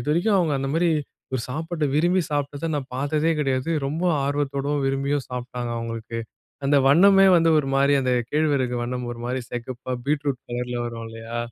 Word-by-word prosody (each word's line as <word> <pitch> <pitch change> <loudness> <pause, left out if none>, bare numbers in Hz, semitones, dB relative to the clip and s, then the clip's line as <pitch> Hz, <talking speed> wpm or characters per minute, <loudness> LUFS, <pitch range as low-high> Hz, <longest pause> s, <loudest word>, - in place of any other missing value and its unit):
இதுவரைக்கும் 170 - +2
அவங்க 165 -4 +1
அந்த 135 0 -2
மாரி 170 +1 +3 0.4
ஒரு 130 - 0
சாப்பாட 160 +3 -3
விரும்பி 175 +5 +3
சாப்ட்டத 145 +2 -2
நான் 135 -2 -3
பாத்ததே 150 +4 0
கெடையாது. 135 0 0 0.2
ரொம்ப 155 +5 -3 0.2
ஆர்வத்தோடும், 145 0 -1
விரும்பியும் 135 +1 0
சாப்ட்டாங்க 125 -1 -4
அவங்களுக்கு. 115 0 -5 0.5
அந்த 140 +1 +3
வண்ணமே 195 +7 +7
வந்து 165 -1 +4
ஒரு 140 -2 -1
மாரி 140 +1 +4
அந்த 130 -1 +1 0.2
கேழ்வரகு 145 -5 +1
வண்ணம் 125 0 -3
ஒரு 120 - -9
மாரி 125 +1 -2
செக்கப்பா, 125 +1 -5
பீட்ரூட் 145 -3 0
கலர்ல 125 0 -3
வரும் 115 -1 -5
இல்லையா? 115 +1 -6
140 Hz, 160 wpm, -24 LUFS, 125-150 Hz, 0.5 s, வண்ணமே